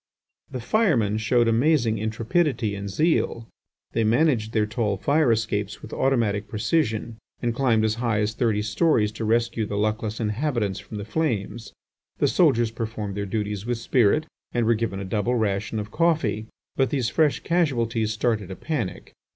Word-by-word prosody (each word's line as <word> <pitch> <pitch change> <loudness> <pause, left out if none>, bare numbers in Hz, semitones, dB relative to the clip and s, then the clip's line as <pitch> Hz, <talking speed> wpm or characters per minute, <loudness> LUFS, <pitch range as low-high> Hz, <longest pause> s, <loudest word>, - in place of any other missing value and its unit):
The 130 - -5
firemen 120 - +2
showed 120 +1 +2
amazing 115 -2 +2
intrepidity 115 +2 0
and 100 0 -5
zeal. 115 - 0 0.4
They 115 - +1
managed 115 -1 +2
their 110 -2 +2
tall 105 -2 -1
fire 145 +5 +2
escapes 105 -2 -1
with - - -9
automatic 110 -6 +1
precision, 110 -1 -1 0.2
and 120 -1 -1
climbed 115 -3 +2
as 110 - +1
high 115 -4 +1
as 105 +1 0
thirty 110 -3 0
storeys 105 - +2
to 110 +1 -5
rescue 115 -1 +1
the 100 - -3
luckless 110 +1 -1
inhabitants 110 -3 -1
from 105 +1 -9
the 100 - -5
flames. 115 -4 -2 0.5
The - - +2
soldiers 115 -1 +3
performed 110 -3 -4
their 100 0 -3
duties 105 0 -3
with 120 -1 0
spirit, 120 +5 +2 0.3
and 120 -2 +1
were 115 - +4
given 110 -3 -2
a 100 - -5
double 110 +5 0
ration 110 -1 -1
of 105 0 -4
coffee. 150 -11 +1 0.3
But 135 -1 +2
these 130 -6 0
fresh 155 -3 +2
casualties 120 -10 0
started 110 -3 -1
a 95 - -6
panic. 120 - -4
115 Hz, 165 wpm, -24 LUFS, 105-125 Hz, 0.5 s, were